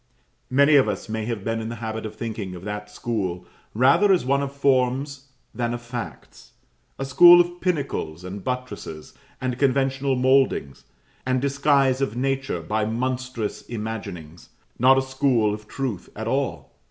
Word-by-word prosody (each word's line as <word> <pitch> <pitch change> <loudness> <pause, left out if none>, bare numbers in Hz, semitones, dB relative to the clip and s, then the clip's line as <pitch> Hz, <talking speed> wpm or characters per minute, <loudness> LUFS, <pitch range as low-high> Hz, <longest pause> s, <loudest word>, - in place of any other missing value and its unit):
Many 140 +3 +5
of 130 - +4
us 105 0 -4
may 110 0 -3
have 115 -4 -4
been 115 +1 -2
in 110 - -4
the 115 - -5
habit 110 0 -4
of 110 - -11
thinking 110 -5 -5
of 90 - -10
that 105 0 -5
school 100 -5 -3 0.3
rather 135 - +5
as 185 - +3
of 130 - -6
one 140 0 +3
of 140 -1 -3
forms 140 0 0 0.3
than 120 -1 -2
of 120 - -7
facts 120 -1 -8 0.4
a 135 - -3
school 175 +6 +8
of 175 0 0
pinnacles, 140 - -2
and 95 +1 -7
buttresses, 125 -11 -5 0.3
and 130 -1 -3
conventional 135 0 +1
mouldings, 130 - +1 0.4
and 130 0 0
disguise 140 -1 +2
of 125 -5 -1
nature 135 -7 -1
by 105 +6 -1
monstrous 125 0 -3
imaginings 105 -8 -7 0.3
not 130 +2 +6
a 135 - +2
school 130 -5 +1
of 105 0 -8
truth 130 -8 -4
at - - -5
all. - - -2
125 Hz, 165 wpm, -24 LUFS, 110-135 Hz, 0.4 s, school